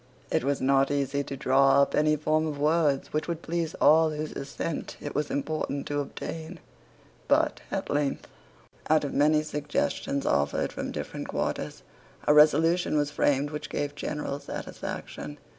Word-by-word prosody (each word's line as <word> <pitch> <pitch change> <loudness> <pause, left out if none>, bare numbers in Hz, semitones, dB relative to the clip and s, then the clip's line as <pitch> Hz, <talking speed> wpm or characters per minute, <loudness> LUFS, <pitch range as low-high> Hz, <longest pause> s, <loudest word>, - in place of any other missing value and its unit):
It - - +1
was 140 +1 0
not 135 +1 +3
easy 140 0 0
to 135 - -6
draw 135 +1 +4
up - - -2
any 155 0 +3
form 155 +1 +1
of 150 -2 -4
words 150 -2 +1
which 155 - -1
would 170 -1 -4
please 165 -1 -2
all 160 +1 +5
whose 155 0 -4
assent 145 +3 -5
it 145 - -6
was 150 0 -1
important 145 -1 -2
to 145 0 0
obtain; 160 +4 -6 0.7
but - - +2
at - - -3
length, 145 -1 -1 0.6
out 155 0 +4
of 145 - -3
many 150 +2 +3
suggestions 145 -2 -2
offered 70 0 +1
from - - -4
different - - -5
quarters, - - -3 0.4
a 150 - +6
resolution 155 +3 +5
was 145 0 +1
framed 145 0 +1
which 150 0 -5
gave 145 0 -2
general 145 -1 -4
satisfaction. 145 0 -6
150 Hz, 160 wpm, -27 LUFS, 140-155 Hz, 0.7 s, a